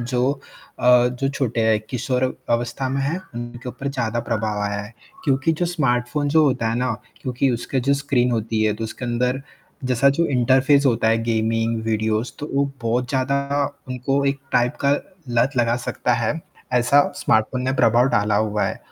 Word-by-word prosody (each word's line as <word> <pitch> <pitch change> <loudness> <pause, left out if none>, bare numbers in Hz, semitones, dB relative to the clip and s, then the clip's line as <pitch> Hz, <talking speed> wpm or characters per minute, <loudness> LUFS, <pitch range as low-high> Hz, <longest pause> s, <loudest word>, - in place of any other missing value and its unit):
जो 125 +2 0 0.5
अ, 125 0 +5
जो 125 +2 -2
छोटे 130 -4 -1
हैं 110 -1 +4
किशोर 125 +1 0 0.3
अवस्था 120 +2 -1
में 135 +1 -1
हैं, 150 +6 -1 0.2
उनके 120 +1 -7
ऊपर 130 +3 -5
ज़्यादा 120 -4 -2
प्रभाव 110 -2 -1
आया 100 0 -2
है 105 +3 -11 0.3
क्योंकि 135 +3 +2
जो 175 +2 -1
स्मार्टफोन 145 -3 0
जो 155 +2 +4
होता 125 -5 +1
है - - -1
ना 125 -1 0 0.3
क्योंकि 130 +1 0
उसका 120 +2 -2
जो 135 +3 +2
स्क्रीन 140 -3 +1
होती 110 -1 -1
है, 105 -1 +2
तो 110 +1 -5
उसके 110 +3 -6
अंदर 125 +2 -1 0.4
जैसा 130 +1 +3
जो 170 - +2
इंटरफेस 135 +3 +4
होता 115 -3 +2
है 115 0 +3
गेमिंग 115 0 0
वीडियोज 110 +1 -1
तो 150 - -5
वो 140 +1 +3 0.2
बहुत 120 +2 0
ज़्यादा 135 +2 +1 0.5
उनको 130 +2 -1
एक 140 0 0
टाइप 120 0 +2
का 140 - +4 0.4
लत 120 +3 +3
लगा 120 -1 +2
सकता 125 0 -1
है 115 -2 0 0.4
ऐसा 125 +3 +5 0.2
स्मार्टफोन 110 +3 +1
ने 130 +1 0
प्रभाव 120 +3 +4
डाला 105 -3 +2
हुआ 105 0 +1
है - - -3
125 Hz, 180 wpm, -22 LUFS, 115-135 Hz, 0.5 s, अ